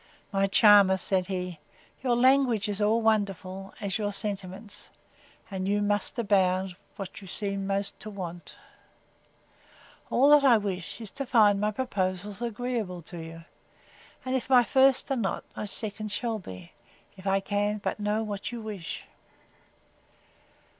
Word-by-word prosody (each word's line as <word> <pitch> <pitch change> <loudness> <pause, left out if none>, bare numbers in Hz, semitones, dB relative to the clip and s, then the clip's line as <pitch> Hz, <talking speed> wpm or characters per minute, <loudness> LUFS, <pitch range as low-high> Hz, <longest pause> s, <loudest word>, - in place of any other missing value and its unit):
My 195 -1 +2
charmer! 200 -2 +6
says 185 -1 0
he, 180 -3 -4 0.4
your 250 -2 +2
language 250 -4 +4
is 205 0 -2
all 220 +2 +2
wonderful, 195 -3 -1
as 200 +1 -2
your 205 -1 -1
sentiments; 200 0 -5 0.6
and 190 -1 -3
you 205 +1 +2
most 205 +3 0
abound, 190 -4 +2 0.2
when 195 - -5
you 195 - -12
seem 195 +1 -2
most 200 0 -2
to 215 - -7
want!—All 190 +7 -5
that 295 -1 +7
I 250 -4 +7
wish, 195 0 -4
is 220 - -7
to 275 - -4
find 210 -6 +4
my 210 - +2
proposals 200 -4 -3
agreeable 230 -6 -3
to 175 +2 -8
you; 165 0 -9 0.8
and 255 0 -1
if 260 - -2
my 250 -2 +7
first 265 +2 +3
are - - +2
not, 220 -6 -2
my 210 - -4
second 215 +1 -2
shall 225 0 -2
be, 90 - -10 0.4
if 190 +1 -9
I 195 0 +3
can 205 +1 -1
but 210 - -3
know 210 +1 0
what 205 0 -4
you 240 - -5
wish. 205 -7 -6
205 Hz, 145 wpm, -28 LUFS, 190-225 Hz, 0.8 s, that